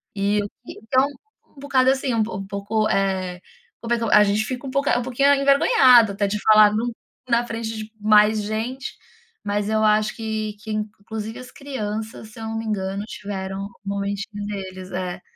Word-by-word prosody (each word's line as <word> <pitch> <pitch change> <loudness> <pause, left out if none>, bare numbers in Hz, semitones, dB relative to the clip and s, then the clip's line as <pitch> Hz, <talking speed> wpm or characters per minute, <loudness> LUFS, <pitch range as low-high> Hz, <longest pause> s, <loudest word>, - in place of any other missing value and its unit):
E 200 +1 +1
eu 205 - -4 0.2
que - - -10
então, 260 +4 +2
é - - +1 0.4
um 280 - -18
bocado, 265 -2 +2
assim, 265 -2 -1
um 225 -1 +2 0.2
pouco, 205 +2 -1
eh, 190 -2 -1 0.4
como 235 0 -1
é - - +2
que 230 - -3
o - - -1
a 210 0 +7
gente 205 +1 +1
fica 255 +1 -5
um 260 - -5
pouca 275 -2 +1
um - - 0
pouquinho 275 +3 +3
envergonhado, 275 - +5
até 200 +1 0
de 210 +1 -2
falar 215 -1 +7
no 235 +3 -1 0.4
na 235 0 +2
frente 225 -1 -4
de 215 0 -7
mais 210 0 +4
gente. 225 +6 -4 0.5
Mas 205 0 -1
eu 220 0 +1
acho 215 0 +2
que 220 -1 -3
que, 220 0 -7
inclusive, 215 +1 -5
as 255 0 -11
crianças, 220 -5 -5
se 235 - -12
eu 225 - -6
não 225 0 -3
me 225 - -4
engano, 200 -2 -2
tiveram 195 -2 -5
um - - -8 0.2
momentinho 200 +1 -3
deles, 190 -2 -7
é. 180 0 -4
215 Hz, 195 wpm, -22 LUFS, 205-235 Hz, 0.5 s, a